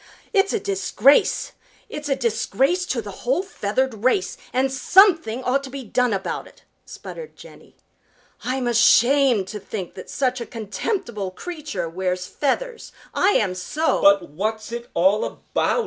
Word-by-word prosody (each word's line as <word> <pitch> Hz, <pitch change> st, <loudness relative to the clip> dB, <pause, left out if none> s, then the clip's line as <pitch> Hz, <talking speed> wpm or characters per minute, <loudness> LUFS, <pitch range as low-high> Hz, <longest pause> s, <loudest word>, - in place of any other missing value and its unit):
"It's 390 Hz, -1 st, +3 dB
a 445 Hz, -, 0 dB
disgrace! 390 Hz, -, +2 dB, 0.4 s
It's 300 Hz, 0 st, -6 dB
a 275 Hz, -, +2 dB
disgrace 270 Hz, -, 0 dB
to -, -, -2 dB
the -, -, -7 dB
whole -, -, +1 dB
feathered 235 Hz, -, -2 dB
race, 360 Hz, +10 st, +1 dB, 0.2 s
and 265 Hz, +1 st, +1 dB
something 320 Hz, -, +4 dB
ought 270 Hz, +2 st, +1 dB
to -, -, -8 dB
be 275 Hz, 0 st, -7 dB
done 250 Hz, +2 st, +1 dB
about 195 Hz, -1 st, -3 dB
it!" -, -, -20 dB, 0.2 s
sputtered 480 Hz, -2 st, -9 dB
Jenny. -, -, -15 dB, 0.7 s
"I'm 255 Hz, 0 st, -2 dB
ashamed 240 Hz, -1 st, +4 dB
to 210 Hz, -, -5 dB
think 195 Hz, -2 st, -6 dB
that 185 Hz, -, -10 dB
such 255 Hz, -2 st, -1 dB
a 235 Hz, -, -5 dB
contemptible 220 Hz, -, -3 dB
creature 305 Hz, -, -5 dB
wears 180 Hz, +2 st, -2 dB
feathers! 460 Hz, -, -2 dB, 0.2 s
I 395 Hz, +2 st, +3 dB
am 195 Hz, -4 st, +2 dB
so!" 290 Hz, -, -1 dB
"But 200 Hz, -3 st, +5 dB
what's 215 Hz, +8 st, -3 dB
it 235 Hz, 0 st, -6 dB
all 190 Hz, +5 st, +3 dB
about?" -, -, -1 dB
255 Hz, 150 wpm, -22 LUFS, 210-310 Hz, 0.7 s, But